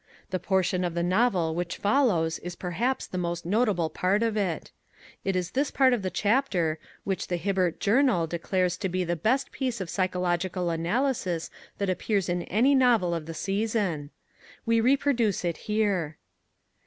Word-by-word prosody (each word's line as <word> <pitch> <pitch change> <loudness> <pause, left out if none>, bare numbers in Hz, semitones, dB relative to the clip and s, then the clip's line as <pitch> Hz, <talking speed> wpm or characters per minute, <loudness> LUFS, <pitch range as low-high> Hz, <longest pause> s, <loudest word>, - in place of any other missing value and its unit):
The 185 - -1
portion 185 0 +1
of 175 -1 -2
the 170 - 0
novel 180 -3 +2
which 175 +1 -3
follows 200 - +2
is 175 0 -7
perhaps 225 +10 -1
the 185 - -5
most 170 -1 -3
notable 190 -5 +1
part 195 +4 +1
of 225 -2 0
it. 195 -6 -2 0.5
It 195 -1 0
is 180 -1 -1
this 280 +2 0
part 260 -2 +4
of 240 - 0
the 190 - -2
chapter 190 - +1 0.2
which 195 -1 -2
the 175 - -1
Hibbert 185 -1 0
Journal 225 -4 +3
declares 180 +2 -1
to 190 - -2
be 185 +1 -1
the 175 0 -1
best 235 - 0
piece 255 -4 -2
of 185 -3 -4
psychological 180 -1 0
analysis 175 0 -1 0.3
that 200 - -1
appears 190 +1 0
in 175 0 0
any 240 +9 +3
novel 240 -10 +4
of 165 -2 -4
the 165 - -6
season. 195 -5 -1 0.6
We 230 -1 +3
reproduce 245 -6 +2
it 170 -1 -1
here. 195 -8 0
185 Hz, 165 wpm, -27 LUFS, 175-225 Hz, 0.6 s, part